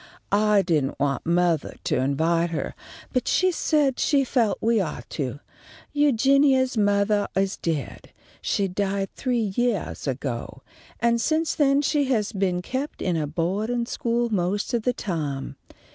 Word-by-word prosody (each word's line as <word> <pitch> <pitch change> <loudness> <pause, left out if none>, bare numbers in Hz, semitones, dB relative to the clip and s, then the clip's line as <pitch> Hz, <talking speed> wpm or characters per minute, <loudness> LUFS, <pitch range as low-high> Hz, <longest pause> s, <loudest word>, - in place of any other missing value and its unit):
I 210 -1 +4
didn't 150 -8 0
want 140 +1 -1
mothah 170 -2 +1
to - - 0
invite 160 +6 +1
her, 165 - -3 0.4
but 255 - 0
she 370 0 +3
said 295 -5 +1
she 280 -2 +3
felt 240 -5 +1
that - - -5
we 230 -1 +3
ought 160 -5 -5
to. 140 0 -4 0.5
Eugenia's 275 -1 +3
mothah 205 0 +2
is 195 0 +1
dead. 155 -5 -4 0.3
She 200 - 0
died 195 +1 -2
three 235 -6 -1
yeahs 240 -10 -1
ago, 130 -1 -4 0.4
and 235 0 +2
since 315 +3 +1
then 280 -1 +3
she's 265 -8 +1
been 185 -4 -1
kept 265 +8 -4
in 180 -2 0
a 155 -2 -1
boa'din' 200 +10 -1
school 240 -3 -1
most 200 +5 -1
of 235 - +1
the 250 +3 +1
time. 145 - -4
205 Hz, 145 wpm, -24 LUFS, 170-250 Hz, 0.5 s, I